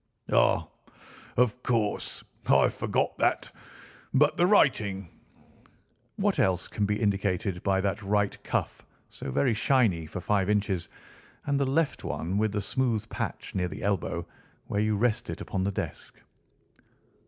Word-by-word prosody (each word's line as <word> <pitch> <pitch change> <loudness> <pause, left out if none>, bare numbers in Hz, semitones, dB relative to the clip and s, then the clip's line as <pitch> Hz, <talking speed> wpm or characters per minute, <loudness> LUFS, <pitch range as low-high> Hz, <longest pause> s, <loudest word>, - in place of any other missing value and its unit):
"Ah, - - +4 0.7
of 125 0 +2
course, 110 -5 -1 0.2
I - - +5
forgot - - -1
that. - - +1 0.6
But 145 +2 +4
the 175 - +3
writing?" 105 - +3 1.1
"What - - +1
else 95 -1 +2
can 105 -2 -1
be 105 +1 0
indicated 100 -3 0
by 95 -1 +1
that 100 +1 -1
right 100 0 +1
cuff - - -2 0.3
so 70 - -7
very 120 - +2
shiny 110 - +2
for 90 - -5
five 100 +1 +1
inches, 100 -4 0 0.6
and 140 -1 +1
the 140 - +1
left 150 0 0
one 90 +5 -2
with 110 -1 +1
the 105 0 -1
smooth 120 -2 0
patch - - -4
near 90 -1 0
the - - -7
elbow 100 -2 -1 0.4
where 100 - -1
you 110 -1 +1
rest 115 0 +1
it - - -4
upon 95 -1 -2
the 100 - 0
desk?" - - -6
105 Hz, 145 wpm, -28 LUFS, 95-120 Hz, 1.1 s, I